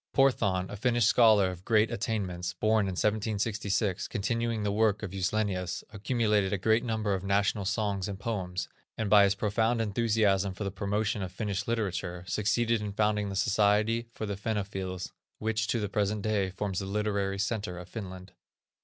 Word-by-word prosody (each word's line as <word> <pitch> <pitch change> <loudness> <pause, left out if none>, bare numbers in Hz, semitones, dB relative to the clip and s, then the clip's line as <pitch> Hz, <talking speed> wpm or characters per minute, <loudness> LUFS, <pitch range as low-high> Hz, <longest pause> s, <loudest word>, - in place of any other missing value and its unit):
Porthan, 100 -9 +3
a - - -5
Finnish 120 +2 +2
scholar 110 -5 +5
of 90 0 -10
great 110 0 +3
attainments, 95 -6 -2
born 110 +3 +2
in 95 - -2
1766, 105 -1 0
continuing 115 0 -1
the 100 - 0
work 105 0 +2
of 100 - -4
Juslenius, 95 -1 -1
accumulated 105 -2 +1
a 100 - +1
great 110 +5 +2
number 110 -4 -1
of 95 -1 -2
national 100 0 +1
songs 100 -1 -1
and 100 -1 -5
poems, 95 -5 -3 0.3
and 110 -3 -2
by 105 -1 +8
his 100 0 +2
profound 110 +3 +1
enthusiasm 105 -3 +1
for 105 - -4
the 100 - -2
promotion 100 +2 -1
of 95 -1 -4
Finnish 100 0 -3
literature, 95 -6 -2
succeeded 110 +3 +1
in 105 -1 -4
founding 105 -1 +1
the 95 - -4
Society 110 +2 +2
of 110 - -2
the 100 - -2
Fennophils, 95 -3 -3 0.3
which 110 0 -1
to 115 - 0
the 105 - -1
present 100 +1 -1
day, 105 -3 +1
forms 95 0 -3
the 95 - -4
literary 100 -1 -1
centre 100 -2 -2
of 90 -1 -8
Finland. 95 -3 -8
105 Hz, 170 wpm, -29 LUFS, 95-110 Hz, 0.3 s, by